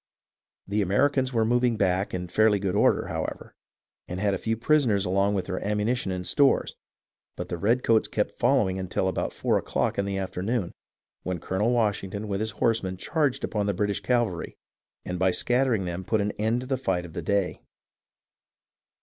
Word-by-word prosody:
The 105 Hz, +2 st, 0 dB
Americans 130 Hz, +7 st, +2 dB
were 115 Hz, -3 st, +2 dB
moving 120 Hz, 0 st, +2 dB
back 95 Hz, -1 st, +1 dB
in 90 Hz, -1 st, -4 dB
fairly 105 Hz, +3 st, +3 dB
good 95 Hz, -2 st, -2 dB
order, -, -, +3 dB
however, -, -, -5 dB, 0.5 s
and 90 Hz, +1 st, -5 dB
had 100 Hz, 0 st, +1 dB
a 95 Hz, -, -2 dB
few 115 Hz, 0 st, -1 dB
prisoners 115 Hz, -6 st, +2 dB
along 100 Hz, +2 st, +2 dB
with 95 Hz, -, -1 dB
their 95 Hz, -, -3 dB
ammu 105 Hz, 0 st, -1 dB
nition 120 Hz, -4 st, 0 dB
and 90 Hz, -1 st, -4 dB
stores, 135 Hz, +10 st, +2 dB, 0.6 s
but 90 Hz, 0 st, -6 dB
the 85 Hz, -, -3 dB
redcoats 115 Hz, +2 st, +2 dB
kept 105 Hz, -, -1 dB
following 120 Hz, -7 st, +2 dB
until 95 Hz, 0 st, -1 dB
about 95 Hz, -, -1 dB
four -, -, +1 dB
o'clock -, -, -1 dB
in 100 Hz, -, +1 dB
the 100 Hz, -1 st, -2 dB
afternoon, 95 Hz, +2 st, -2 dB, 0.5 s
when 90 Hz, -2 st, -3 dB
Colonel 95 Hz, +7 st, 0 dB
Wash 110 Hz, -4 st, +1 dB
ington 100 Hz, +2 st, -5 dB
with 100 Hz, -2 st, -2 dB
his 110 Hz, +1 st, -1 dB
horsemen 110 Hz, -6 st, 0 dB
charged 145 Hz, -, 0 dB
upon 105 Hz, -2 st, -1 dB
the 100 Hz, -, 0 dB
British 100 Hz, +1 st, -1 dB
cav 120 Hz, -1 st, +2 dB
alry, 90 Hz, -6 st, -6 dB, 0.5 s
and 90 Hz, 0 st, -4 dB
by 95 Hz, 0 st, +3 dB
scattering 120 Hz, 0 st, +1 dB
them 90 Hz, +1 st, -4 dB
put 110 Hz, +3 st, 0 dB
an 105 Hz, 0 st, 0 dB
end 110 Hz, +4 st, -1 dB
to -, -, -7 dB
the 135 Hz, 0 st, -1 dB
fight 90 Hz, -8 st, -1 dB
of 85 Hz, -, -11 dB
the 85 Hz, -, -4 dB
day. 100 Hz, +2 st, -1 dB
105 Hz, 190 wpm, -26 LUFS, 95-115 Hz, 0.6 s, fairly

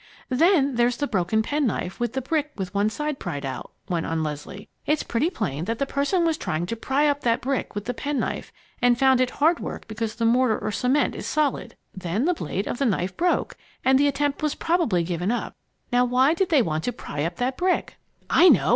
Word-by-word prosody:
"Then 280 Hz, -1 st, +3 dB
there's 240 Hz, 0 st, +2 dB
the 290 Hz, -, 0 dB
broken 220 Hz, -2 st, +1 dB
penknife 240 Hz, -8 st, -1 dB
and 240 Hz, -2 st, 0 dB
the 265 Hz, +1 st, -3 dB
brick 300 Hz, +1 st, -1 dB
with 185 Hz, -3 st, -5 dB
one 205 Hz, +1 st, +2 dB
side 300 Hz, +4 st, -3 dB
pried 145 Hz, -1 st, -4 dB
out," 130 Hz, -1 st, -5 dB, 0.2 s
went 175 Hz, -4 st, -1 dB
on 165 Hz, -1 st, -1 dB
Leslie. 150 Hz, +6 st, -6 dB, 0.2 s
"It's 300 Hz, +1 st, +2 dB
pretty 265 Hz, +9 st, 0 dB
plain 165 Hz, -, -3 dB
that 225 Hz, +3 st, -2 dB
the 275 Hz, -, 0 dB
person 285 Hz, +6 st, +1 dB
was 320 Hz, -1 st, +1 dB
trying 155 Hz, +2 st, -2 dB
to 230 Hz, -, -3 dB
pry 270 Hz, +6 st, +1 dB
up 285 Hz, 0 st, +1 dB
that 230 Hz, -1 st, +2 dB
brick 265 Hz, -4 st, -2 dB
with 205 Hz, -1 st, -4 dB
the 245 Hz, -, -2 dB
penknife 285 Hz, +3 st, -3 dB, 0.3 s
and 245 Hz, -1 st, +4 dB
found 265 Hz, -1 st, +4 dB
it 255 Hz, -, +2 dB
hard 320 Hz, +6 st, +2 dB
work -, -, -6 dB
because 220 Hz, 0 st, -4 dB
the 230 Hz, 0 st, -1 dB
mortar 235 Hz, -1 st, +3 dB
or 215 Hz, -, -3 dB
cement 260 Hz, +6 st, +1 dB
is -, -, -6 dB
solid. 300 Hz, -3 st, -1 dB, 0.2 s
Then 190 Hz, -, -1 dB
the 360 Hz, -, +3 dB
blade 200 Hz, -, -3 dB
of -, -, -3 dB
the 275 Hz, -, +2 dB
knife 185 Hz, -3 st, -1 dB
broke 350 Hz, +1 st, 0 dB, 0.3 s
and 265 Hz, 0 st, +5 dB
the 285 Hz, -, +4 dB
attempt 285 Hz, 0 st, 0 dB
was 305 Hz, -1 st, 0 dB
probably 330 Hz, -, +1 dB
given 175 Hz, +2 st, -2 dB
up. 245 Hz, -, -2 dB, 0.4 s
Now 245 Hz, 0 st, +4 dB
why 255 Hz, +4 st, +3 dB
did 365 Hz, +2 st, 0 dB
they 295 Hz, -7 st, +4 dB
want 155 Hz, -3 st, -2 dB
to 245 Hz, -, 0 dB
pry 145 Hz, -10 st, -5 dB
up 170 Hz, +2 st, -2 dB
that 255 Hz, +1 st, -1 dB
brick?" 365 Hz, +3 st, 0 dB, 0.3 s
"I 360 Hz, +2 st, +6 dB
know! 175 Hz, -, +4 dB
245 Hz, 225 wpm, -24 LUFS, 200-290 Hz, 0.4 s, I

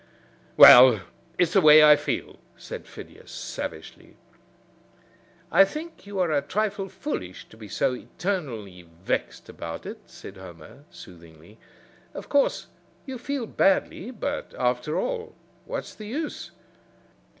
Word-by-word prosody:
"Well, 120 Hz, -4 st, +9 dB, 0.4 s
it's 175 Hz, -1 st, +1 dB
the 195 Hz, -, +5 dB
way 155 Hz, -1 st, +8 dB
I 150 Hz, 0 st, +8 dB
feel," -, -, -4 dB, 0.2 s
said -, -, -9 dB
Phidias, -, -, -13 dB
savagely. -, -, -8 dB, 1.4 s
"I -, -, +7 dB
think 305 Hz, -, -7 dB
you 200 Hz, -1 st, -7 dB
are 180 Hz, -3 st, +1 dB
a 145 Hz, -2 st, +1 dB
trifle 205 Hz, 0 st, -3 dB
foolish 95 Hz, -, -6 dB
to -, -, -16 dB
be 110 Hz, -1 st, -11 dB
so 105 Hz, +5 st, 0 dB
eternally 125 Hz, -, -5 dB
vexed 85 Hz, +2 st, -5 dB
about 85 Hz, -1 st, -8 dB
it," -, -, -8 dB
said 95 Hz, -, -12 dB
Homer, 95 Hz, -, -13 dB
soothingly. 85 Hz, +3 st, -15 dB, 0.6 s
"Of -, -, -8 dB
course 285 Hz, -1 st, +1 dB, 0.4 s
you 265 Hz, -3 st, -7 dB
feel 275 Hz, -1 st, -4 dB
badly, 195 Hz, +1 st, 0 dB
but, 280 Hz, +4 st, -5 dB
after 125 Hz, +4 st, -1 dB
all, 480 Hz, -2 st, -4 dB, 0.3 s
what's -, -, -6 dB
the 215 Hz, -, -10 dB
use? 300 Hz, +7 st, -5 dB
155 Hz, 130 wpm, -25 LUFS, -, 1.4 s, Well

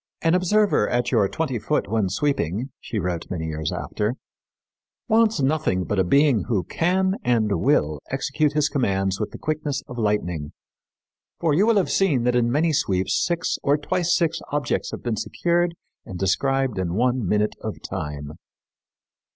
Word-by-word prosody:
'An 165 Hz, 0 st, +3 dB
observer 185 Hz, -, +3 dB
at 120 Hz, 0 st, 0 dB
your 110 Hz, -6 st, +3 dB
twenty 150 Hz, -7 st, -2 dB
foot 150 Hz, +2 st, -1 dB
when 105 Hz, -2 st, 0 dB
sweeping,' 125 Hz, -, -1 dB
she 115 Hz, -, -5 dB
wrote 90 Hz, -3 st, -3 dB
many 80 Hz, -3 st, -3 dB
years 80 Hz, -1 st, -3 dB
after, 105 Hz, +4 st, -2 dB, 0.9 s
'wants 225 Hz, -1 st, +3 dB
nothing 135 Hz, -10 st, +1 dB
but 105 Hz, +1 st, -1 dB
a -, -, +4 dB
being 140 Hz, +3 st, +3 dB
who 105 Hz, -7 st, 0 dB
can 190 Hz, -, +1 dB
and 110 Hz, -7 st, +1 dB
will 75 Hz, 0 st, +2 dB
execute 140 Hz, +2 st, 0 dB
his 150 Hz, -1 st, +2 dB
commands 95 Hz, -8 st, 0 dB
with 105 Hz, -, -2 dB
the -, -, -9 dB
quickness 150 Hz, -3 st, -2 dB
of 120 Hz, -1 st, -7 dB
lightning; 90 Hz, -8 st, -1 dB, 0.9 s
for 165 Hz, -3 st, +2 dB
you 195 Hz, +9 st, +3 dB
will 230 Hz, -2 st, +4 dB
have 195 Hz, -, +1 dB
seen 155 Hz, -11 st, +2 dB
that 125 Hz, 0 st, +2 dB
in 120 Hz, -1 st, +2 dB
many 155 Hz, +4 st, +2 dB
sweeps 95 Hz, -7 st, +1 dB
six 175 Hz, +1 st, -1 dB
or 145 Hz, +1 st, +2 dB
twice 175 Hz, +3 st, 0 dB
six 165 Hz, -1 st, 0 dB
objects 145 Hz, -3 st, -1 dB
have -, -, -7 dB
been 115 Hz, -3 st, -1 dB
secured 175 Hz, -, 0 dB, 0.3 s
and 95 Hz, -, -8 dB
described 130 Hz, +4 st, 0 dB
in 90 Hz, -1 st, -2 dB
one 125 Hz, +2 st, +1 dB
minute 105 Hz, +2 st, +1 dB
of -, -, -5 dB
time.'" 75 Hz, -1 st, -5 dB
125 Hz, 165 wpm, -23 LUFS, 95-155 Hz, 0.9 s, a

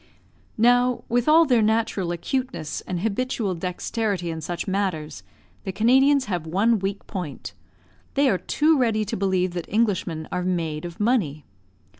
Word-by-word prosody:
Now, 245 Hz, +2 st, +3 dB
with 240 Hz, +2 st, +1 dB
all 325 Hz, +2 st, +6 dB
their 250 Hz, -5 st, +3 dB
natural 215 Hz, -4 st, +1 dB
acuteness 250 Hz, -, -3 dB
and 180 Hz, -2 st, -3 dB
habitual 225 Hz, -1 st, -1 dB
dexterity 180 Hz, +1 st, -2 dB
in 160 Hz, 0 st, -5 dB
such 175 Hz, +5 st, -4 dB
matters, 160 Hz, -, -2 dB, 0.4 s
the 190 Hz, -, -3 dB
Canadians 265 Hz, +7 st, +4 dB
have 175 Hz, -6 st, -3 dB
one 210 Hz, +7 st, +2 dB
weak 195 Hz, +1 st, -4 dB
point; 180 Hz, -8 st, -6 dB, 0.6 s
they 280 Hz, 0 st, +4 dB
are 190 Hz, -8 st, +2 dB
too 305 Hz, -1 st, +2 dB
ready 220 Hz, -4 st, +1 dB
to -, -, -3 dB
believe 185 Hz, -2 st, 0 dB
that 175 Hz, -2 st, -5 dB
Englishmen 185 Hz, -7 st, 0 dB
are 180 Hz, -, -1 dB
made 170 Hz, -4 st, -2 dB
of 170 Hz, -1 st, -8 dB
money. 200 Hz, -, 0 dB
200 Hz, 150 wpm, -24 LUFS, 175-240 Hz, 0.6 s, all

